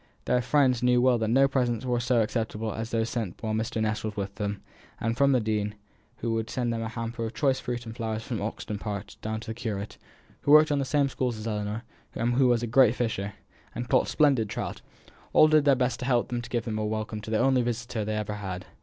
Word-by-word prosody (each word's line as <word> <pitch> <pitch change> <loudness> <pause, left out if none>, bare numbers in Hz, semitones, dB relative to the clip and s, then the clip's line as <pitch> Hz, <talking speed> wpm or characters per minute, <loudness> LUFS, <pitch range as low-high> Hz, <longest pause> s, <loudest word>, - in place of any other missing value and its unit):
Their 125 - +2
friends 130 -2 +3
knew 125 0 +4
well 125 -1 +4
that 110 - 0
no 135 +5 +5
presents 125 -3 0
were 125 -1 +1
so 120 -1 +2
acceptable 110 -1 -2
as 115 0 -4
those 115 -1 0
sent 115 -6 -3
while 110 -1 -1
Mr. 110 +1 -1
Ness 110 0 -1
was 110 -1 -3
with 100 -1 -3
them; 100 0 -4 0.4
and 115 +1 -1
from 140 +2 +4
the 130 - +4
dean, 105 -1 -1 0.4
who 115 0 -2
would 115 0 -2
send 120 -2 -1
them 115 - -2
a 110 - -3
hamper 115 0 -4
of 115 +1 -4
choice 135 -3 +2
fruit 120 -1 -4
and 115 0 -7
flowers 110 -2 -3
from 115 -2 -4
Oxton 105 0 -4
Park, 105 -1 -5
down 110 0 -3
to 110 - -6
the - - -3
curate, 110 -4 -5 0.4
who 145 - +4
worked 155 0 +7
in 145 - +2
the 135 - 0
same 140 +1 +2
schools 125 -3 -2
as 110 - -7
Ellinor, 105 0 -3 0.3
and 120 +1 0
who 130 +1 +4
was 120 -1 +2
a - - +1
great 125 0 +5
fisher, 105 -5 -2 0.4
and 120 +1 -4
caught 130 - +3
splendid 135 -8 +3
trout - - -4 0.5
all 155 - +7
did 155 -1 +4
their 140 -2 +6
best 125 0 0
to 125 - -4
help 120 -2 +2
them 120 -1 -2
to 120 - -9
give 120 -2 -2
a 110 -1 -1
welcome 110 0 -3
to 105 - -8
the 110 - +1
only 130 +2 +3
visitor 120 -2 -2
they 110 +1 -2
ever 105 -1 -2
had. 95 -3 -5
115 Hz, 245 wpm, -27 LUFS, 110-125 Hz, 0.5 s, worked